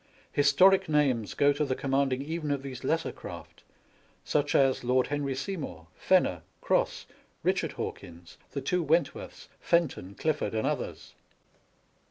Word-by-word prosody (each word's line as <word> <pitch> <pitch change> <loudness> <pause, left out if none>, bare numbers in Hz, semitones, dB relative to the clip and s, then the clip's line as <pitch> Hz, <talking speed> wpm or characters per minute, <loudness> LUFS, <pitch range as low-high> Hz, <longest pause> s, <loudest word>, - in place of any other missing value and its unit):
Historic 185 +7 +5
names 135 -8 +1
go 145 0 +4
to 145 - -1
the 130 -3 -1
commanding 135 -1 0
even 160 0 -4
of 140 -1 -1
these 130 -2 -7
lesser 160 +5 0
craft, - - -10 0.6
such 145 -1 0
as 135 -2 +3
Lord 125 +1 +2
Henry 140 -1 -2
Seymour, 140 - -5
Fenner, - - +2 0.2
Cross, - - 0 0.4
Eichard - - +1
Hawkins, 85 -1 -8
the 140 - -4
two 180 +7 0
Wentworths, 160 -1 -1
Fenton, 140 - 0
Clifford, 150 -4 -1
and 110 - 0
others. - - -3
140 Hz, 135 wpm, -29 LUFS, 130-155 Hz, 0.6 s, Historic